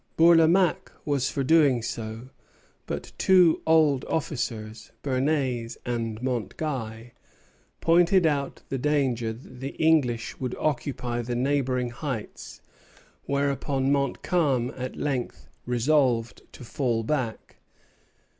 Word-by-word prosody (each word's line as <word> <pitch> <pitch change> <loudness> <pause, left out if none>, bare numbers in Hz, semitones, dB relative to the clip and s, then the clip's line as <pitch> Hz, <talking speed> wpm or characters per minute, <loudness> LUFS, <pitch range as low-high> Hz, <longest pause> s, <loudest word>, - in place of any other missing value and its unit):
Bourlamaque 170 +2 +4
was 140 -3 0
for 140 - -2
doing 140 -5 +4
so; 115 +2 -5 0.6
but - - -5
two 180 -4 +5
old 155 -4 +4
officers, 115 -7 -4
Bernès 130 -3 -1
and 115 -2 -3
Montguy, 120 -2 -4 0.7
pointed 175 +2 +4
out 140 -3 -1
the 135 - -2
danger 130 -5 0
that 125 +2 -12
the 135 +2 -6
English 135 -8 +1
would 125 -2 -3
occupy 125 -4 -2
the 120 +1 -4
neighboring 130 -1 0
heights; 120 -3 -6 0.7
whereupon 140 -1 0
Montcalm 140 -1 0
at 130 0 -5
length 135 -4 -3 0.2
resolved 125 -2 +1
to - - -11
fall 120 -2 -1
back. 125 -3 -3
130 Hz, 105 wpm, -26 LUFS, 120-150 Hz, 0.7 s, two